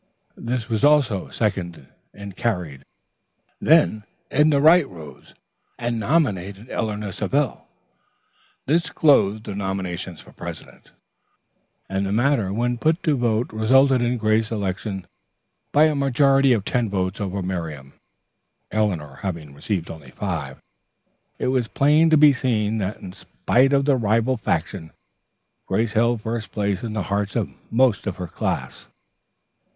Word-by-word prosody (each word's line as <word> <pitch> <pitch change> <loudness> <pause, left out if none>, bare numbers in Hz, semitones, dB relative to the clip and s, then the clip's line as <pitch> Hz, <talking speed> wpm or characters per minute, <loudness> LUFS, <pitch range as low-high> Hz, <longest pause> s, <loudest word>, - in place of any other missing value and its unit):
This 120 -1 -2
was 110 +1 -2
also 140 -10 +3
seconded 90 - -3 0.2
and 100 -2 -10
carried. 90 - -3 0.7
Then 150 -9 +3 0.3
Edna 150 0 +3
Wright 160 0 +5
rose 80 -5 -13 0.4
and 120 -1 -2
nominated 105 - -1
Eleanor 105 -2 -3
Savell. 135 +7 -1 1.0
This 165 +5 +1
closed 110 -9 +3
the 105 - -6
nominations 95 -3 -4
for - - -15
president, - - -10 1.0
and 95 +1 -2
the 100 - -2
matter 115 -3 +1
when 120 +3 -1
put 160 +5 +1
to 155 -3 +2
vote 120 -2 0
resulted 130 +4 +4
in 120 +1 0
Grace's 110 0 +1
election 95 -2 -3 0.7
by 150 - +5
a 155 -1 +4
majority 135 -1 +3
of 110 -5 +1
ten 120 -3 0
votes 95 0 -2
over 100 -1 -3
Miriam, 80 -7 -5 0.8
Eleanor 90 -10 -1
having 80 -7 -5
received 85 +4 -3
only 75 -5 -11
five. 80 -7 -4 0.8
It - - -1
was 130 -3 +1
plain 150 +7 +3
to 160 - +5
be 150 -1 +7
seen 110 -4 0
that 100 +1 -3
in 95 - -9
spite 130 +7 +1
of 140 -1 +2
the 140 -2 +3
rival 115 +3 +1
faction, 95 -7 -3 0.7
Grace 110 +3 0
held 115 0 +2
first 115 0 -4
place 100 -2 -1
in 115 -2 -5
the 105 -3 -2
hearts 100 -1 -1
of - - -1 0.2
most 120 -3 +2
of 95 - -2
her 90 - -4
class. 85 - -4
110 Hz, 140 wpm, -22 LUFS, 95-130 Hz, 1.0 s, be